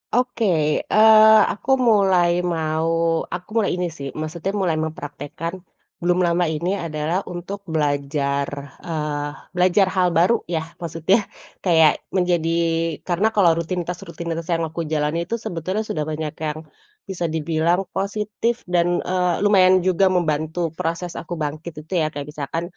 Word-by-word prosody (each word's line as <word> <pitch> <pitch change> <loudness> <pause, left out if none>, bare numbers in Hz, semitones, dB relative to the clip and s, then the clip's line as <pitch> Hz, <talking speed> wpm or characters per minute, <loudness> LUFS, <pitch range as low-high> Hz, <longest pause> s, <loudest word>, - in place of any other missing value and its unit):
Oke, 245 -2 +1 0.5
eee, 220 0 +8
aku 215 - -8 0.2
mulai 190 -5 +4 0.2
mau 160 0 -1 0.5
aku 180 +2 -6
mulai 210 - +1
ini 180 -1 -1
sih 140 - -5
maksudnya 170 +4 -3
mulai 170 -4 +1
mempraktekkan, 150 +1 -6 0.5
belum 175 +1 +2
lama 175 +1 +2
ini 170 +4 -2 0.2
adalah 155 +2 -1 0.2
untuk 175 +3 -6
belajar, 140 -1 0 0.4
eee, 150 -2 -2 0.3
belajar 185 +2 +4
hal 185 -1 +3
baru 180 +8 +5 0.2
ya, 160 - +1 0.2
maksudnya, 165 +4 +1 0.5
kayak 160 -4 +6 0.2
menjadi 175 -3 +1 0.6
karena 180 +4 +2
kalau 190 -5 +5
rutinitas-rutinitas 170 -1 -4
yang 165 0 0
aku 165 +2 -4
jalani 150 +2 0
itu 230 - -1
sebetulnya 185 +6 -2
sudah 155 - -1
banyak 155 -1 -3 0.2
yang 150 +1 -4 0.5
bisa 180 -2 -4
dibilang 160 +3 +1
positif, 210 +3 -1
dan, 175 -1 +2 0.2
eee, 180 -1 +1
lumayan 185 -2 +5
juga 185 +1 +3
membantu 160 -2 0 0.2
proses 170 +1 -3
aku 170 - -7
bangkit 155 +3 -5
itu 190 - -7
ya, - - +1
kayak 145 0 -6
misalkan, 150 +2 -4
170 Hz, 135 wpm, -22 LUFS, 155-185 Hz, 0.6 s, eee